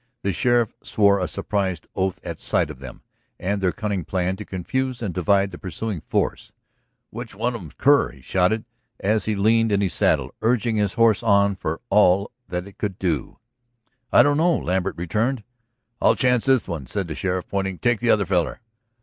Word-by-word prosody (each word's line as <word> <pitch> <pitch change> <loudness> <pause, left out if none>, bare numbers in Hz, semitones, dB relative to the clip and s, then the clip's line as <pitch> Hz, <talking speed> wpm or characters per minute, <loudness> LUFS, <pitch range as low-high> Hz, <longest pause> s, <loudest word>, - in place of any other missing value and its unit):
The 100 - 0
sheriff 120 +2 +2
swore 100 -1 +3
a 90 - -1
surprised 95 -1 -2
oath 95 -1 -1
at - - -6
sight - - 0
of 70 - -12
them, 65 -2 -10 0.4
and 100 +2 -1
their 95 -1 +2
cunning 105 -5 -3
plan 95 +2 -1
to 105 - -6
confuse 125 +8 -3
and 105 -6 -3
divide 100 +2 +2
the 90 - -9
pursuing 95 -1 -4
force. - - -2 0.6
"Which - - -8
one - - -1
of - - -6
'em's - - -12
Kerr?" - - +4
he 65 +1 -17
shouted 95 - +1 0.3
as 105 +2 +1
he 110 - 0
leaned 110 +2 +3
in 100 - +2
his 95 -5 0
saddle, - - +1
urging 115 -1 +1
his 105 -2 0
horse 115 -2 +4
on 100 -3 +3
for 80 -3 -4
all 100 -1 +4 0.2
that 90 0 -4
it 100 - -15
could 100 -3 -3
do. 85 -8 -2 0.7
"I - - +7
don't 145 0 +2
know," 170 +1 +3
Lambert 95 +1 -1
returned. 110 +8 -1 0.6
"I'll - - +5
chance 125 -1 +2
this 130 -3 +3
one," 80 -8 -5
said 100 +3 -2
the 80 - -4
sheriff, 90 +1 -2
pointing. 95 -2 -2
"Take 120 +1 +1
the 120 - 0
other 105 -3 +4
feller." 90 -4 0
100 Hz, 190 wpm, -23 LUFS, 90-110 Hz, 0.7 s, I